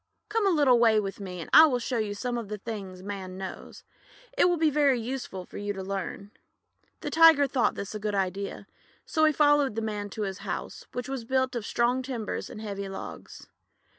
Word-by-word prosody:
Come 430 -1 +1
a - - +5
little 285 -8 +4
way 225 -2 +5
with 195 -1 -4
me, 185 -3 -6
and - - -7
I 315 +1 +10
will 255 -4 +1
show 245 0 -2
you 205 -2 -2
some 245 +3 -3
of 235 -3 -4
the 210 +1 -5
things 195 -4 -7
Man 190 -2 -6
knows. 190 -1 -8 0.5
It - - +4
will 350 - +1
be 315 -1 +3
very 280 -3 +3
useful 230 -6 -5
for - - -9
you 205 0 -2
to 190 -1 -6
learn." 195 +1 -5 0.7
The - - -4
Tiger 325 -3 +7
thought 265 -3 +1
this 200 +1 -5
a 215 - -4
good 210 0 -2
idea, 195 +1 -2 0.4
so 315 -1 +2
he 310 - +5
followed 290 -5 +3
the 225 - -1
Man 210 -2 -3
to 215 +2 -4
his 195 -2 -4
house, - - -6
which 250 0 -4
was 265 -3 -4
built 260 +2 0
of 230 -3 -3
strong 245 +2 +1
timbers 250 -5 -4
and 215 - -8
heavy 200 -2 -5
logs. 195 - -8
225 Hz, 215 wpm, -28 LUFS, 200-265 Hz, 0.7 s, I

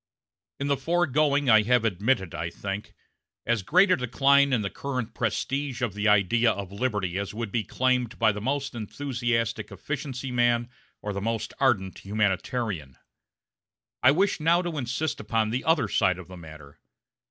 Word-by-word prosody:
In 140 - -2
the 140 -1 +1
foregoing 150 -4 +1
I 110 -3 +7
have 120 +1 +2
admitted, 100 -1 0
I 85 - -3
think, 100 +4 -6 0.5
as 120 -3 +1
great 185 - +4
a - - +6
decline 140 +2 +3
in 120 -5 +1
the 100 - -2
current 130 -5 -4
prestige 130 +3 -2
of 115 -5 -1
the 105 +1 -1
idea 105 +3 +4
of 100 -2 -5
liberty 100 -4 -2
as 100 +1 -5
would 115 -2 -4
be 115 0 0
claimed 125 +1 0
by 110 -2 +4
the 105 0 -6
most 140 +4 -2
enthusiastic 120 0 -2
efficiency 135 -3 -5
man 120 0 +1 0.3
or 105 - -3
the 100 - -4
most 115 +1 -2
ardent 105 -9 +1
humanitarian. 100 - -2 1.0
I - - +4
now - - +5
wish 195 +3 +2
to 170 +2 +2
insist 130 +5 -2
upon 110 0 0
the 125 +3 -2
other 160 -8 +3
side 95 -2 +2
of 90 -3 -10
the 95 - -9
matter. 75 -4 -13
120 Hz, 165 wpm, -26 LUFS, 105-135 Hz, 1.0 s, I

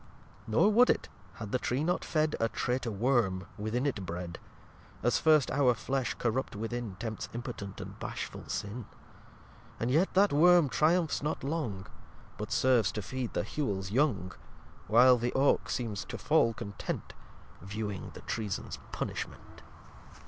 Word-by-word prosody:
lxx 100 +3 -24
Nor 160 - +4
would 245 +4 +6
it, - - +1 0.3
had 110 -3 -7
the 130 - +1
Tree 130 +5 -1
not 175 +2 0
fed 155 -1 +1
A 115 - +2
Traitor 125 +1 -1
worm, 105 -4 +1
within 110 +5 -2
it 115 -9 -1
bred. 85 -1 -5 0.6
(As - - +3
first 155 -9 +4
our 130 -4 +3
Flesh 135 +2 -1
corrupt 120 +1 -1
within 115 -1 -4
Tempts 110 +1 -5
impotent 100 -4 -6
and - - -8
bashful - - -5
Sin.) 105 +3 -4 0.9
And 115 +2 0
yet 165 +8 +3
that 200 -1 +5
Worm 170 0 +6
triumphs 160 +4 +2
not 150 -1 -2
long, 135 -11 -2 0.5
But - - -5
serves 125 -6 +3
to 105 - -3
feed 130 0 -4
the - - 0
Hewels 100 -10 -2
young. 110 - +1 0.6
While 125 +3 +6
the 120 +1 -1
Oake 140 +1 +3
seems 110 -6 -2
to - - -6
fall 115 -1 +3
content, 100 -1 -5 0.5
Viewing 100 +1 -4
the - - -9
Treason's 105 -4 -4
Punishment. - - -5
120 Hz, 150 wpm, -31 LUFS, 105-140 Hz, 0.9 s, would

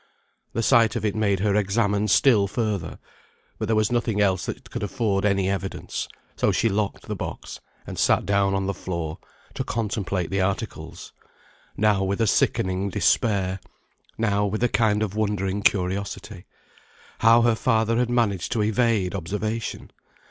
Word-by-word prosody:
The 115 - -1
sight 115 -2 +4
of - - -2
it 105 - +1
made 100 -3 +1
her 100 -1 +2
examine 105 0 +1
still 105 -2 +4
further, 100 -5 -2 0.6
but - - -2
there 110 - +2
was 110 +2 +2
nothing 115 -3 0
else 95 -3 +1
that 120 - -7
could 120 - -4
afford 105 -2 -1
any 100 -2 +2
evidence, 95 0 -3 0.3
so - - +2
she 115 - +1
locked 100 0 -2
the - - -5
box, - - -6 0.3
and - - -7
sat - - +3
down 100 0 +2
on 95 0 -1
the 100 - -1
floor 85 -5 -5 0.3
to - - -3
contemplate 100 -6 -2
the 95 0 +1
articles; 95 -1 -4 0.6
now 105 -2 +3
with 100 +2 -1
a 115 - +3
sickening 95 -1 +1
despair, 95 -1 +1 0.6
now 105 -2 +1
with 105 +3 -1
a 120 - +3
kind 110 -2 +2
of 105 -1 -4
wondering 100 -2 -1
curiosity, 100 0 -1 0.7
how 115 +1 +6
her 120 -1 +4
father 115 0 +1
had 120 0 +1
managed 110 -7 0
to 110 - +1
evade 110 -3 +1
observation. 105 +4 -4
105 Hz, 160 wpm, -24 LUFS, 95-110 Hz, 0.7 s, how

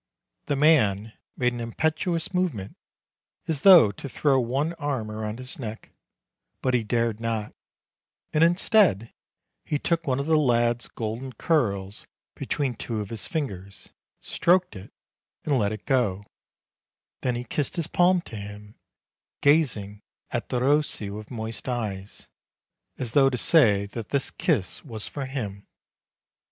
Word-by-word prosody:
The 145 - +1
man 115 -8 +3 0.2
made 125 -1 +1
an 120 - -5
impetuous 160 +9 -1
movement, 155 - -2 0.7
as 155 -4 0
though 175 - +8
to 140 +7 -8
throw 135 0 +2
one 135 +7 -1
arm 135 -8 -2
round 110 0 -4
his 130 +2 -6
neck; 110 -3 -7 0.7
but 130 - +1
he 120 -2 +2
dared 115 0 0
not, 115 -2 -3 0.8
and 155 - +4
instead 175 - +3 0.5
he 150 - -1
took 165 +2 -1
one 130 0 +1
of 140 - -2
the 160 0 +3
lad's 120 -3 +2
golden 115 +4 -5
curls 105 - -1 0.3
between 140 -4 -2
two 115 -1 -4
of 105 0 -5
his 115 - -3
fingers, 100 - -5 0.3
stroked 180 -4 +2
it 95 +1 -10 0.5
and 140 -4 +2
let 100 -1 +1
it 110 -1 -7
go; 105 -8 +1 1.0
then 125 -2 0
he 120 - -3
kissed 135 +3 -3
his 170 - 0
palm 180 +2 +3
to 115 - -10
him, 105 +1 -9 0.7
gazing 115 -9 +2 0.3
at - - -3
Derossi 130 -4 +1
with 105 +1 -8
moist 110 0 -5
eyes, 105 -5 -5 0.7
as 125 -4 -2
though 135 +1 +5
to 125 - -2
say 110 -9 +4
that 110 +2 -7
this 140 -1 0
kiss 125 - -1
was 110 -7 -7
for 140 -3 -5
him. 105 -7 -5
120 Hz, 145 wpm, -25 LUFS, 105-145 Hz, 1.0 s, though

